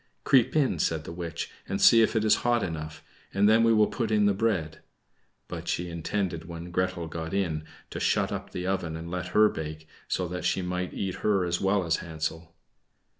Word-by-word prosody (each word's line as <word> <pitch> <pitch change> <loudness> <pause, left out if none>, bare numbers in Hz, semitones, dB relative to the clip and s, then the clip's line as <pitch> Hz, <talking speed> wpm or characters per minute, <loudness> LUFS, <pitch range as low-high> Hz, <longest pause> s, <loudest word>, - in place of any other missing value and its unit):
"Creep 130 0 +4
in," 135 - +2
said 80 0 0
the - - -7
witch, 85 -1 -5 0.2
"and 95 - -1
see 115 - +7
if 110 - +2
it 110 -1 +2
is 105 - +5
hot 120 -2 +1
enough, 80 -2 -5 0.3
and 100 +1 +4
then 110 +1 +5
we 115 - +5
will 110 -1 +5
put 115 0 -2
in 105 -1 +3
the 100 - +4
bread." 95 -7 -1 0.7
But - - -7
she 90 0 -2
intended 85 0 -2
when 85 0 -7
Gretel 90 -1 -1
got 80 +2 -5
in 80 -6 -1 0.3
to - - -4
shut - - +1
up - - -5
the 90 - -4
oven 90 -4 -1
and 85 +1 -7
let 90 0 -3
her 105 0 +8
bake, 80 -3 -6 0.2
so 90 - -1
that 90 0 -4
she 95 - 0
might 90 0 -3
eat 95 -2 -3
her 100 -4 +1
as 85 0 -1
well 95 -1 +2
as 80 0 +1
Hansel. 80 0 -5
90 Hz, 210 wpm, -27 LUFS, 80-105 Hz, 0.7 s, her